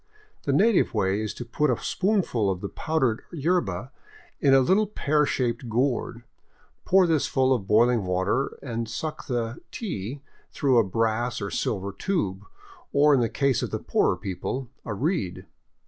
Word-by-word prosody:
The 140 - +1
native 195 - +3
way 100 0 +1
is 110 - -2
to 120 - -6
put 150 +5 0
a 125 - +2
spoonful 185 - 0
of 95 -1 -2
the 100 - -4
powdered 135 -8 0
yerba 140 - -1 0.5
in 140 - +3
a 135 - +7
little 190 +11 +3
pear 150 -7 +1
shaped 120 -2 -1
gourd, 120 0 -1 0.6
pour 190 0 +5
this 160 -4 +1
full 130 0 +2
of 105 -7 -2
boiling 115 +1 +4
water, 95 +8 0
and 115 -3 -4
suck 155 +6 -5
the 120 -2 -2
'' - - -47
tea 140 - -5
" - - -35
through 130 -4 +3
a - - +5
brass 115 +4 -1
or 100 - -4
silver 100 -1 -2
tube, 100 - -2 0.5
or 145 +1 +5
in 135 - +4
the 115 -2 +1
case 140 -4 +1
of - - -2
the - - -2
poorer - - +1
people, 120 +7 -4
a 115 - -3
reed. 130 - -2
125 Hz, 175 wpm, -26 LUFS, 110-150 Hz, 0.6 s, a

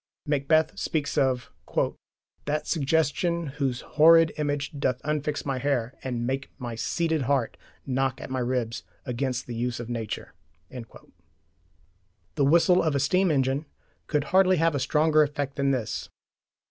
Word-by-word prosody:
Macbeth 150 +2 +1
speaks 150 -3 -2
of 130 -2 +1 0.9
that 150 +1 -1
suggestion 160 +2 +1 0.2
Whose 125 -3 0
horrid 165 +1 +5
image 145 -1 -1
doth 125 -2 0
unfix 150 -1 -2
my 135 -2 -1
hair 125 -3 -1
And 120 -2 -2
make 135 +2 -2
my 120 -3 -5
seated 160 +6 -1
heart 135 -5 +1 0.3
knock 135 0 -1
at - - -8
my 130 - -1
ribs 120 -2 -1 0.2
Against 125 +1 -2
the 120 - -6
use 120 +1 -2
of 120 -1 -6
nature. 115 -3 -5 2.0
The 140 - +2
whistle 170 +5 +5
of 155 -3 0
a - - +2
steam 180 +7 +2
engine 135 0 0 0.4
could 150 -2 +1
hardly 185 -1 +5
have 165 0 +2
a 140 - 0
stronger 155 +3 +3
effect 145 -2 -1
than 140 -1 +1
this. 125 -6 -2
140 Hz, 145 wpm, -26 LUFS, 130-155 Hz, 2.0 s, horrid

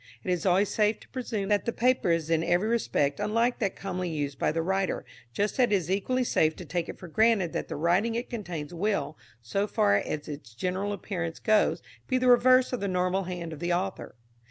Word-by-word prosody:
It 185 - -1
is 180 +1 0
always 190 +3 +3
safe 215 0 +1
to - - -17
presume 220 -6 -3
that 205 -1 +2
the 235 - 0
paper 250 -4 +2
is 165 -1 +1
in 165 0 +2
every 175 +5 +2
respect 175 -11 0
unlike 230 +4 +1
that 200 -4 -1
commonly 185 -2 -3
used 145 -4 -3
by - - +2
the 165 +1 -1
writer, 190 +2 -1 0.3
just 205 - -1
as 250 - +7
it 235 - -6
is 185 -4 +1
equally 250 +7 +1
safe 160 -9 +2
to 180 - -9
take 170 +1 -3
it - - -7
for 185 - -10
granted 205 -1 +2
that - - -3
the - - -5
writing 180 +9 +1
it 240 +2 -2
contains 175 -9 -5
will, 200 -1 -1 0.3
so 195 - -1
far 100 - +3
as 150 +7 -3
its 140 -7 -8
general 185 - -2
appearance 180 -4 -4
goes, 215 -1 +2 0.2
be 255 - +1
the 255 0 +1
reverse 255 +1 +5
of 250 - -1
the 200 - -2
normal 185 +1 0
hand 175 -2 -5
of 150 - -9
the 175 +1 0
author. 190 +2 -3
190 Hz, 225 wpm, -28 LUFS, 170-215 Hz, 0.3 s, as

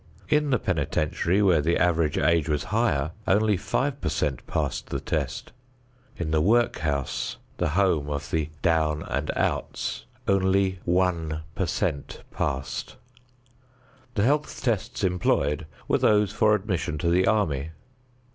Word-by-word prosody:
In 150 -1 +2
the 130 - +3
penitentiary, 85 +2 0
where 90 -6 +4
the 85 +3 +1
average 85 -3 +2
age 85 -3 +2
was 75 -1 0
higher, 80 -10 +1 0.2
only 105 +2 +3
five 135 +9 -1
per - - 0
cent 70 -5 -2
passed 70 -3 -2
the - - -2
test. - - -3 0.7
In 80 -2 -3
the 80 -1 +3
work 115 +7 +3
house 70 -3 -2 0.2
the - - 0
home 85 -7 +2
of 70 0 -4
the 80 -2 0
"down 80 -2 +2
and 70 +3 -3
outs" - - -2 0.2
only 95 -1 +2
one 85 -3 0
per - - -1
cent 70 - -2
passed. 65 -2 -3 1.2
The 100 - +2
health 145 +5 0
tests 115 0 -1
employed 80 -4 +1 0.2
were - - +2
those 105 -1 +3
for 105 0 +4
admission 90 -6 -2
to 85 +3 0
the 90 +2 +3
army. 80 -10 +1
85 Hz, 140 wpm, -26 LUFS, 75-100 Hz, 1.2 s, where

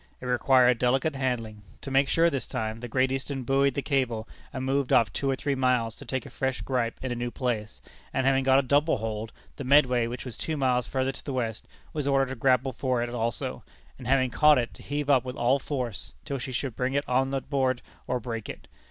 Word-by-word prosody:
It - - -9
required 125 0 +4
delicate 135 +4 +1
handling. 115 -5 -2 0.2
To 135 - -6
make 135 0 +3
sure 165 +1 +4
this 135 -5 -3
time, 110 0 -3
the 120 - -6
Great 130 +2 +1
Eastern 135 0 -3
buoyed 135 +1 +2
the 140 - -1
cable, 125 -6 0 0.2
and 130 -1 -4
moved 135 0 0
off 115 - +4
two 135 - -1
or 135 - +2
three 140 +2 -1
miles 125 -4 +1
to 140 - -10
take 130 0 -3
a - - -10
fresh 130 -1 -2
gripe 125 -3 -1
in 130 - -2
a - - -1
new 120 0 -2
place; 120 -4 -3 0.3
and 130 - 0
having 135 0 +3
got 130 0 +5
a 140 - +4
double 145 +4 +2
hold, 110 0 -4 0.3
the 140 - -5
Medway, 125 -3 +4
which 120 +3 -6
was 125 - -6
two 160 -1 -3
miles 125 -3 +1
further 130 0 0
to - - -13
the 140 - -4
west, 115 -4 -3 0.3
was 150 -3 -2
ordered 135 -1 +2
to 135 - -4
grapple 130 +1 +2
for 125 -1 0
it 120 - -3
also; 115 -2 -3 0.4
and 125 - -8
having 130 -1 +3
caught 150 +3 +6
it, 120 -1 -1
to - - -14
heave 145 0 -3
up 135 -4 +4
with 125 0 -6
all 125 +4 +2
force, 125 -7 -4
till 140 -1 -3
she 130 +2 -5
should 130 -1 -3
bring 130 +2 -1
it 140 - 0
on 130 +1 +2
board 135 -2 -1 0.2
or 125 - 0
break 115 -2 -5
it. - - -8
130 Hz, 235 wpm, -27 LUFS, 120-135 Hz, 0.4 s, caught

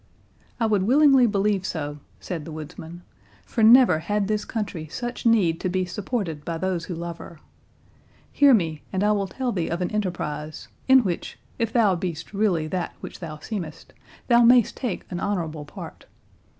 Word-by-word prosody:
"I 230 - +2
would 210 -3 +2
willingly 265 +3 +5
believe 200 -2 +1
so," 150 -5 -4 0.2
said 170 -5 -5
the 160 - -8
woodsman, 160 +3 -9 0.4
"for 230 - -2
never 225 -6 +7
had 205 +4 -1
this 210 0 -1
country 200 -8 -4
such 240 +8 -4
need 185 -8 +3
to 185 - -2
be 185 0 0
supported 180 - -4
by 165 +1 -3
those 180 -1 -2
who 180 - -5
love 170 0 -6
her. 165 - -11 0.9
Hear 285 -1 +5
me, 160 -7 -1
and 190 +1 -1
I 210 - +3
will 200 -2 0
tell 255 +4 -3
thee 175 -6 -2
of 170 - -2
an 180 - -2
enterprise, 155 -7 -4 0.2
in 265 -1 +7
which, 180 -5 -4 0.2
if 230 -2 0
thou 220 -5 +4
be'st 170 0 -5
really 195 -6 +1
that 180 +3 -3
which - - -8
thou 155 -3 -7
seemest, 165 -2 -7 0.3
thou 240 -1 +5
mayst 240 -1 +5
take 245 -8 -4
an 175 - -3
honourable 160 -7 -3
part. 145 - -10
185 Hz, 175 wpm, -24 LUFS, 165-220 Hz, 0.9 s, never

